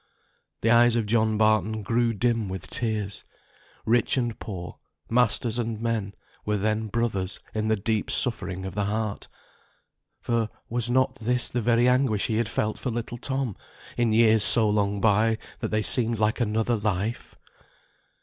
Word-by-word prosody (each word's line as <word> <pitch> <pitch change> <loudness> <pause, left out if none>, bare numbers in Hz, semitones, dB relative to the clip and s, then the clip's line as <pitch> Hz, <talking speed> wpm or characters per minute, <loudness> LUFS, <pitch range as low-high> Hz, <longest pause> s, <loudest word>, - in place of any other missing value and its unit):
The 115 - +2
eyes 120 0 +5
of 115 -2 0
John 110 0 +1
Barton 110 0 +1
grew 115 +3 +1
dim 115 -1 0
with 95 0 -7
tears. 105 -4 -3 0.6
Rich 120 +3 +2
and 120 -2 -2
poor, 90 -5 -7 0.3
masters 120 0 +1
and 115 -2 -3
men, 110 -4 -2 0.3
were 105 0 -1
then 110 +2 -1
brothers 105 -4 -2
in 110 0 -1
the 110 - +2
deep 110 +1 -2
suffering 95 -6 +1
of 95 - -6
the 100 +1 -1
heart; 105 0 -3 0.9
for 115 -2 -1 0.2
was 120 0 -1
not 130 +1 +2
this 125 +2 0
the 120 - -2
very 120 +2 +3
anguish 125 -5 +2
he 110 - -1
had 115 -1 0
felt 110 -1 -2
for 130 - -3
little 120 0 -5
Tom, 130 -5 -2 0.4
in 120 -2 +1
years 110 -1 +4
so 110 +1 +6
long 105 -1 +1
gone 100 - -5
by 110 +1 +3 0.2
that - - -2
they 110 0 0
seemed 115 +4 +2
like 110 +3 0
another 115 +1 0
life! 105 +2 -3
110 Hz, 165 wpm, -25 LUFS, 105-120 Hz, 0.9 s, so